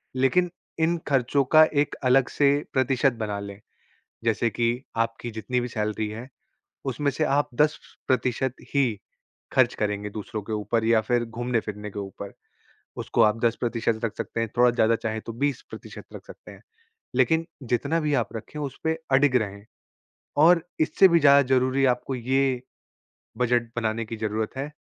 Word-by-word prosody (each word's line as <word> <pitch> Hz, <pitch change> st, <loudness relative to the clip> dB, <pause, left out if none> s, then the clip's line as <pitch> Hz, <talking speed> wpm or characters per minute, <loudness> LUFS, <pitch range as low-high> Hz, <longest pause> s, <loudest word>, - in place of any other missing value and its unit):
लेकिन 170 Hz, +8 st, +2 dB, 0.3 s
इन 165 Hz, +2 st, +2 dB
ख़र्चों 135 Hz, 0 st, +2 dB
का 155 Hz, -, +10 dB
एक 145 Hz, 0 st, +1 dB
अलग 130 Hz, 0 st, +4 dB
से 140 Hz, -1 st, +3 dB, 0.2 s
प्रतिशत 130 Hz, 0 st, +2 dB
बना 105 Hz, -1 st, -3 dB
लें। 100 Hz, 0 st, -8 dB, 0.7 s
जैसे 115 Hz, +1 st, +1 dB
कि 120 Hz, +3 st, -1 dB, 0.2 s
आपकी 115 Hz, +1 st, -5 dB
जितनी 110 Hz, +3 st, -2 dB
भी 120 Hz, -, -3 dB
सैलरी 110 Hz, -2 st, -2 dB
है, 115 Hz, +4 st, -8 dB, 0.6 s
उसमें 140 Hz, +2 st, -1 dB
से 155 Hz, +4 st, -1 dB
आप 145 Hz, +1 st, +1 dB
10% 130 Hz, -3 st, -1 dB, 0.2 s
ही 125 Hz, -7 st, +2 dB, 0.5 s
ख़र्च -, -, +3 dB
करेंगे 105 Hz, 0 st, -2 dB
दूसरों 105 Hz, +1 st, -6 dB
के 110 Hz, -, -7 dB
ऊपर 110 Hz, +2 st, -1 dB
या 115 Hz, -1 st, +4 dB
फिर 120 Hz, +2 st, 0 dB
घूमने-फिरने 115 Hz, -3 st, -3 dB
के 100 Hz, -, -8 dB
ऊपर। 100 Hz, 0 st, -7 dB, 0.7 s
उसको -, -, +1 dB
आप 110 Hz, +1 st, +3 dB
10% 115 Hz, -1 st, 0 dB
रख 115 Hz, -, -1 dB
सकते 115 Hz, -, -3 dB
हैं, 115 Hz, -, -1 dB
थोड़ा 125 Hz, 0 st, +5 dB
ज़्यादा 115 Hz, -1 st, +2 dB
चाहे 110 Hz, 0 st, -3 dB
तो 115 Hz, -, -7 dB
20% 135 Hz, +2 st, -5 dB
रख -, -, -9 dB
सकते -, -, -13 dB
हैं। -, -, -16 dB, 0.5 s
लेकिन 160 Hz, 0 st, +3 dB, 0.2 s
जितना 140 Hz, +7 st, 0 dB
भी 150 Hz, -2 st, -1 dB
आप -, -, -6 dB
रखें 150 Hz, +7 st, -7 dB
उसपे 160 Hz, +3 st, -3 dB
अडिग 135 Hz, -1 st, +4 dB
रहें। 100 Hz, 0 st, -8 dB, 0.8 s
और 175 Hz, -1 st, +6 dB, 0.2 s
इससे 155 Hz, +4 st, +5 dB
भी 170 Hz, -2 st, +4 dB
ज़्यादा 140 Hz, -2 st, +7 dB
ज़रूरी 130 Hz, +1 st, +2 dB
आपको 125 Hz, +2 st, -5 dB
ये 130 Hz, +1 st, 0 dB, 0.8 s
बजट 120 Hz, -1 st, +1 dB
बनाने 115 Hz, -1 st, -1 dB
की 115 Hz, -, -6 dB
ज़रूरत 110 Hz, +2 st, -3 dB
है 135 Hz, +2 st, -3 dB
120 Hz, 160 wpm, -25 LUFS, 110-135 Hz, 0.8 s, का